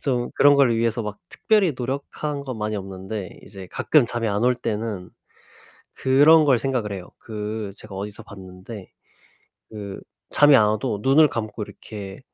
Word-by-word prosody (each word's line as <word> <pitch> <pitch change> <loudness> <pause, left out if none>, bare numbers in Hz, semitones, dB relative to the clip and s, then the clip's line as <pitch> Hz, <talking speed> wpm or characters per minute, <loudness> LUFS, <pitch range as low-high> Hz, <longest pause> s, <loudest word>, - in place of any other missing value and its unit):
좀 125 -3 -1
그런 145 0 +6
걸 135 -4 +4
위해서 115 0 0
막 105 -1 -6
특별히 205 -6 +2
노력한 140 +3 -4
건 130 -4 -6
많이 105 0 -2
없는데 95 +1 -7
이제 95 -2 -10
가끔 145 -7 +3
잠이 120 -1 -2
안 100 +2 -1
올 125 0 +4
때는 110 -5 -4 0.8
그런 145 +4 +5
걸 135 -4 +4
생각을 120 -5 -2
해요. 95 -2 -7
그 105 -1 -5
제가 105 -2 -11
어디서 105 +3 -6
봤는데 95 0 -11 0.8
그 100 -3 -7 0.3
잠이 145 -1 +6
안 110 -5 +5
와도 105 -1 -1
눈을 145 +5 +5
감고 110 -4 -4
이렇게 100 -1 -9
110 Hz, 290 characters per minute, -23 LUFS, 100-130 Hz, 0.8 s, 그런